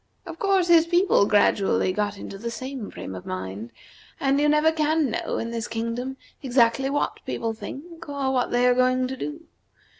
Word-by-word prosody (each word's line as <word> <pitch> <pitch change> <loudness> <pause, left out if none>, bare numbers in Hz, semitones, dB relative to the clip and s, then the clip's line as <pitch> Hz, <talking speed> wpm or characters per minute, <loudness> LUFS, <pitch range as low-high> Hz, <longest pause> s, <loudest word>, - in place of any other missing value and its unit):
Of 330 -2 -9
course, 390 -3 +2
his 335 -1 +6
people 350 - +3
gradually 200 -2 +3
got 205 0 -1
into 195 0 -8
the 235 +2 -4
same 255 -2 -6
frame - - -7
of 90 - -7
mind, 95 +5 -5 0.5
and 275 +1 +2
you 295 - +3
never 300 +2 +4
can 310 -3 +1
know - - -2
in 230 - -3
this 230 0 -3
kingdom 230 +4 -3 0.2
exactly 255 0 +2
what 290 +1 -2
people 225 -1 -3
think 290 +10 -9
or 280 -2 -1
what 250 -1 +1
they 245 +1 +2
are 250 - +5
going 255 0 +2
to 265 - -4
do. 300 +4 -6
255 Hz, 185 wpm, -24 LUFS, 225-300 Hz, 0.5 s, his